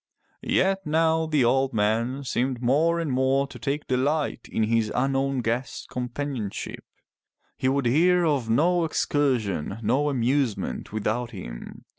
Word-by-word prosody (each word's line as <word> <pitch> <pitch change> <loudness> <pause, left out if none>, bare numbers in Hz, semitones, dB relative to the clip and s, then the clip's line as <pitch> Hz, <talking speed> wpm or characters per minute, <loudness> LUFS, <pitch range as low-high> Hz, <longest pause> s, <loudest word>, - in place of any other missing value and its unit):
Yet 195 0 +1
now 160 +1 +2
the 150 -5 +2
old 130 +2 +2
man 115 +6 0
seemed 125 0 -1
more 155 +8 +2
and 160 -4 -2
more 130 +2 +2
to 140 - -11
take 145 +1 -2
delight 140 +4 -1
in 110 - 0
his 110 -1 +1
unknown 135 +1 +1
guest's 120 +3 -3
companionship; 125 -3 -4 0.7
he 130 - 0
would 135 -1 0
hear 175 +8 +4
of 140 -7 0
no 170 +9 +3
excursion, 125 - 0
no 135 +7 +2
amusement 125 -5 -1
without 110 +3 -1
him. - - -9
130 Hz, 135 wpm, -25 LUFS, 115-145 Hz, 0.7 s, hear